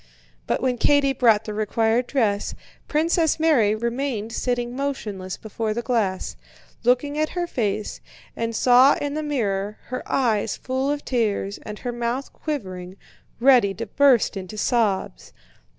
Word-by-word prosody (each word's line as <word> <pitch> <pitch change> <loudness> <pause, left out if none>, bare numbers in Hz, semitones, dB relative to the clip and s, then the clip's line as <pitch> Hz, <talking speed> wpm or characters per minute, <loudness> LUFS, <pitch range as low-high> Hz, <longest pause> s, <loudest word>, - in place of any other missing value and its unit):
But - - -1
when 250 -2 0
Katie 285 0 +3
brought 225 -4 +3
the 215 - -4
required 225 +3 +1
dress, 210 -7 0 0.3
Princess 320 +1 +1
Mary 255 -10 +3
remained 235 -1 -2
sitting 245 0 -2
motionless 210 -9 -4
before 220 0 -3
the 235 - -2
glass, 220 -7 -1 0.5
looking 255 +5 +2
at 310 +3 -1
her 350 - +1
face, 215 - -2 0.3
and 230 0 -3
saw 250 +4 +6
in 285 0 -3
the 310 - -2
mirror 210 -8 -2
her 255 - -3
eyes 225 -6 +1
full 260 +1 -2
of 290 0 -2
tears 210 -5 -1
and 210 0 -8
her 245 - -4
mouth 240 +3 -3
quivering, 185 - -5 0.4
ready 240 -6 +5
to 230 - -4
burst 255 0 +3
into 195 +2 -7
sobs. 205 - 0
235 Hz, 145 wpm, -23 LUFS, 210-270 Hz, 0.5 s, saw